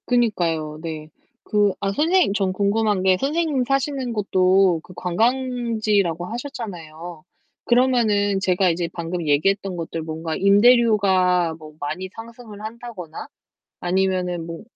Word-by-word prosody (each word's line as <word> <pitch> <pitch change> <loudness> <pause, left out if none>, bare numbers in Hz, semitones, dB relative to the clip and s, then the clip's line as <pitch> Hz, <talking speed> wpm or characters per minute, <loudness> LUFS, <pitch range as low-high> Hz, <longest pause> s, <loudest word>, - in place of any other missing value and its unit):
그니까요, 170 -11 0
네. 155 -2 -6 0.3
그 205 -2 +2
아 195 - -1
선생님, 330 - +2
전 195 -2 0
궁금한 205 0 +1
게 190 -1 +4
선생님 295 -2 0
사시는 275 -2 -1
곳도 190 -3 +3
그 180 - -14
관광지라고 220 -4 0
하셨잖아요. 175 - -7 0.4
그러면은 225 -6 +2
제가 185 -1 +2
이제 170 0 -1
방금 170 -1 -4
얘기했던 190 +6 +1
것들 165 0 -4
뭔가 160 0 -4
임대료가 200 -5 +4
뭐 155 -1 -12
많이 155 +6 -4
상승을 225 -2 -11
한다거나 220 -7 -8 0.5
아니면은 180 -2 -1
뭐 165 -1 -7
195 Hz, 290 characters per minute, -22 LUFS, 175-230 Hz, 0.5 s, 게